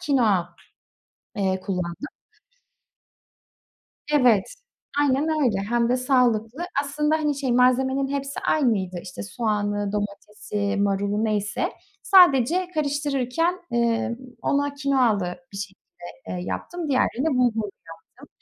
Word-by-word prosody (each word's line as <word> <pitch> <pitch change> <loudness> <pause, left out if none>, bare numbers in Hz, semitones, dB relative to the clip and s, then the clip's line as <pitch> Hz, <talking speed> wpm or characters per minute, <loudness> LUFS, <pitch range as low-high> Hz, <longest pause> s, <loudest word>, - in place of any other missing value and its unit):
kinoa, 215 - +2 0.9
eee, 190 -2 0
kullandım. 180 - -4 2.0
Evet, 245 - +3 0.4
aynen 290 +2 +2
öyle. 215 -7 +2
Hem 235 0 +2
de 250 - +2
sağlıklı. 250 +1 +1 0.2
Aslında 300 +2 0
hani 300 -2 0
şey, 260 -3 0
malzemenin 265 +2 +3
hepsi 275 0 -3
aynıydı. 200 - +1
İşte - - -8
soğanı, 205 -1 -2
domatesi, 205 0 -3
marulu 200 +2 0
neyse. 210 -1 -1 0.3
Sadece 355 - +5
karıştırırken, 290 +3 0
ımm, 235 0 +1 0.3
ona 285 0 0
kinoalı 245 -10 +1 0.2
bir - - -8
şekilde, 195 -1 -9 0.3
eee, 180 - -4
yaptım. 350 -3 -4
Diğerlerini 260 0 +1
de 320 - +3
bulgurlu 225 -5 +1 0.5
yaptım. 280 - -13
245 Hz, 110 wpm, -24 LUFS, 205-280 Hz, 2.0 s, Sadece